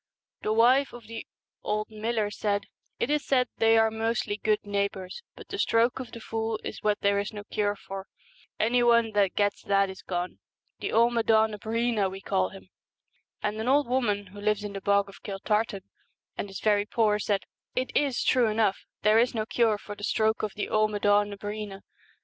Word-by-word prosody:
The 215 - -1
wife 250 +5 +4
of 240 -2 -10
the 225 +1 -8 0.3
old 215 +1 -2
miller 215 -1 -1
said, 205 -1 -1 0.3
'It 270 - -1
is 300 -1 +1
said 250 -2 +2
they 225 0 +5
are 225 0 +4
mostly 220 -1 -1
good 215 0 +1
neighbours, 200 - -2
but - - -13
the 395 - -5
stroke 230 -3 +2
of 255 - -7
the 230 - -8
fool 225 -1 -3
is - - -6
what 210 0 +1
there 200 0 +3
is 205 - -3
no 205 -2 -7
cure 205 0 -1
for; 195 -1 -8 0.5
any 245 +3 +3
one 235 -2 +4
that 200 -3 +2
gets 205 -1 +1
that 195 -1 +2
is 190 - -11
gone. 180 0 -4 0.4
The - - -3
Amaddn 225 -1 +3
na 210 - -5
Breena 225 -1 0
we 190 +1 -7
call 95 - 0
him! 95 -1 -13 0.4
' - - -35
And 210 +1 -1
an 225 - -3
old 280 +1 +4
woman 225 -5 0
who 205 - -9
lives 210 0 +1
in 205 -1 -5
the 195 - -5
Bog 200 0 +3
of 195 -3 -14
Kiltartan, 205 0 -1 0.5
and 200 - -4
is 195 - -7
very 205 -1 +2
poor, 215 -3 +2
said, 200 -1 0 0.3
'It 255 +1 -2
is 280 -4 +1
true 250 -3 +4
enough, 215 -2 +1 0.2
there 215 +1 +5
is 245 +1 +2
no 215 -1 -1
cure 225 -2 +2
for 205 0 -8
the 205 - -11
stroke 220 +1 +1
of 215 -2 -3
the 205 - -2
Amad&n 205 -1 +3
na 200 - -6
Breena. 205 -1 -6
215 Hz, 200 wpm, -27 LUFS, 205-230 Hz, 0.5 s, they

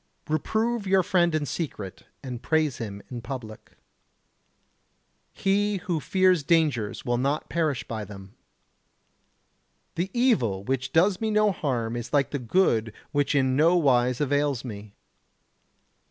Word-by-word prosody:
Reprove 220 +8 -1
your 190 -1 +4
friend 175 -2 +2
in 155 -2 0
secret 105 - -5 0.2
and 125 -3 -6
praise 155 -4 +1
him 100 -3 -6
in 120 -1 -5
public. 115 -4 -8 1.5
He 205 +1 +1
who 175 -3 -2
fears 185 0 +3
dangers 140 -9 +1
will 120 0 0
not 140 +4 -1
perish 155 -6 -1
by 110 -2 -4
them. 95 0 -11 1.6
The 175 +3 -2
evil 195 - +1
which 130 +3 -2
does 185 +4 +3
me 220 - 0
no 210 -1 +3
harm 120 -9 -2
is 120 0 -5
like 140 -2 +2
the 145 - -2
good 115 - +1 0.2
which 145 0 +1
in 130 -2 +2
no 165 +5 +4
wise 125 -5 +2
avails 145 -3 0
me. 105 -3 -8
145 Hz, 135 wpm, -26 LUFS, 120-175 Hz, 1.6 s, your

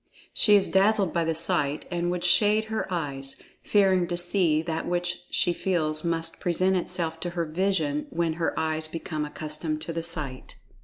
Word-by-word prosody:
She 210 -2 +8
is 200 - +4
dazzled 195 -1 +2
by 170 - +1
the 165 0 -1
sight, 155 -3 0
and 175 0 -1
would 175 0 -2
shade 210 +5 +3
her 220 - -3
eyes, 140 -5 -3 0.2
fearing 190 -4 +2
to 175 0 -2
see 175 -3 +2
that 165 -1 -3
which 175 0 -2
she 175 - +1
feels 155 -5 -1
must 165 -1 -2
present 185 +2 +1
itself 170 -2 -2
to 175 - -4
her 170 -1 -2
vision 155 -3 -1
when 165 -1 -1
her 165 - -1
eyes 155 0 0
become 155 -1 -4
accustomed 155 +1 -3
to 165 - -3
the 165 - -2
sight. 155 -6 -4
170 Hz, 175 wpm, -26 LUFS, 155-180 Hz, 0.2 s, She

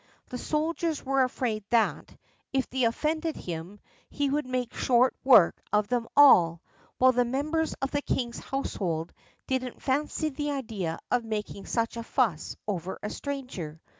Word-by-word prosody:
The 250 - -5
soldiers 315 +1 -1
were 270 0 +2
afraid 245 -4 -1
that, 230 -1 +1 0.3
if 265 -1 0
they 260 -1 +1
offended 310 +7 0
him, 175 +4 -6 0.3
he 285 -1 -1
would 295 -2 0
make 255 -2 -2
short 250 0 +3
work 245 -10 +6
of 210 -1 +2
them 240 -2 0
all, 170 - +7 0.4
while 260 0 +6
the 245 0 +2
members 305 +6 -1
of 270 - -1
the 290 - 0
king's 240 -4 -2
household 175 -11 -3 0.3
didn't 255 -2 -3
fancy 300 +3 0
the 295 +1 -3
idea 220 - -3
of 245 -1 +2
making 210 -2 -5
such 230 0 -1
a 230 - -4
fuss 225 - 0
over 190 -2 -3
a 210 - -3
stranger. 250 - -5
250 Hz, 155 wpm, -28 LUFS, 210-275 Hz, 0.4 s, all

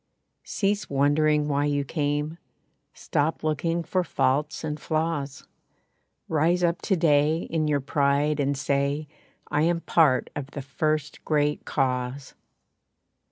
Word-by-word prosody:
Cease 205 0 -1
wondering 150 +2 +2
why 145 0 +1
you 145 -1 0
came 150 +2 -2 0.5
Stop 150 +3 -1
looking 165 +2 0
for 185 +2 0
faults 145 +1 0
and 150 -1 -3
flaws. 155 -3 -2 0.8
Rise 165 +3 +2
up 170 0 +1
to 195 - +1
day 155 -1 +3
in 155 -1 0
your 145 -2 +1
pride 145 +2 +1
and 140 0 0
say, 140 +2 0 0.4
"I 150 - +2
am 170 +1 +1
part 155 -8 +3
of 140 -2 -4
the 145 -1 -7
First 155 +2 -2
Great 150 -1 0
Cause! 130 0 -2
150 Hz, 125 wpm, -26 LUFS, 140-160 Hz, 0.8 s, day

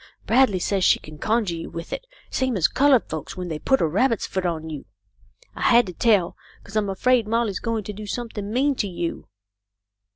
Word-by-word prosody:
Bradley 240 -4 +4
says 190 +1 0
she - - +5
can 155 0 -12
conjure 220 -3 +1
you 165 - -6
with 170 0 -7
it, - - -6 0.2
same 260 -4 0
as 165 -4 +4
coloured 270 - +3
folks 155 +2 -6
when 180 -1 -4
they 155 -2 -4
put 265 +9 +2
a - - +4
rabbit's 220 - +1
foot 190 -1 -2
on 160 -2 -3
you. 150 -3 -7 0.7
I - - -8
had 240 0 +5
to 180 - -7
tell, 200 -3 +2 0.3
'cause 200 - -13
I'm 210 -2 +1
afraid 235 +3 +2
Molly's 225 -3 0
going 230 -2 -2
to 210 - -6
do 210 +1 -8
something 210 -2 -5
mean 275 +5 +2
to 205 - 0
you." 175 - -4
205 Hz, 205 wpm, -23 LUFS, 175-235 Hz, 0.7 s, she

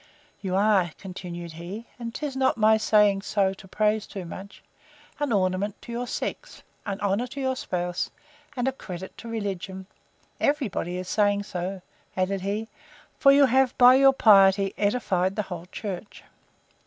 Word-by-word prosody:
You 185 -2 -2
are, 195 -4 +3
continued 175 -3 -7
he, 175 +8 -8
and 235 -1 -5
'tis 285 +2 -5
not 260 -2 +2
my 220 0 +4 0.2
way 205 -2 +5 0.4
to 190 - -13
praise 215 +1 +1
too 195 -3 -7
much, 190 +4 -10 0.6
an 290 -3 -1
ornament 195 0 0
to 235 - -9
your 245 +1 -3
sex, - - -5 0.2
an 200 0 -3
honour 205 +4 0
to 265 +3 -8
your 260 -1 0
spouse, 180 -7 -3 0.5
and 245 +1 0
a - - +2
credit 190 -7 -8
to 235 - -9
religion.—Every 205 - -4
body 175 -1 -3
is 185 0 -5
saying 205 0 +2
so, 185 -1 -5 0.3
added 185 +1 0
he; 205 +3 -2 0.5
for 275 - +7
you 280 0 +6
have, 260 0 +2
by 250 0 +8
your 270 +1 +6
piety, 195 -4 +5
edified 195 -4 0
the 210 - -1
whole 180 -2 -7
church. 200 +1 -7
205 Hz, 155 wpm, -26 LUFS, 185-235 Hz, 0.6 s, by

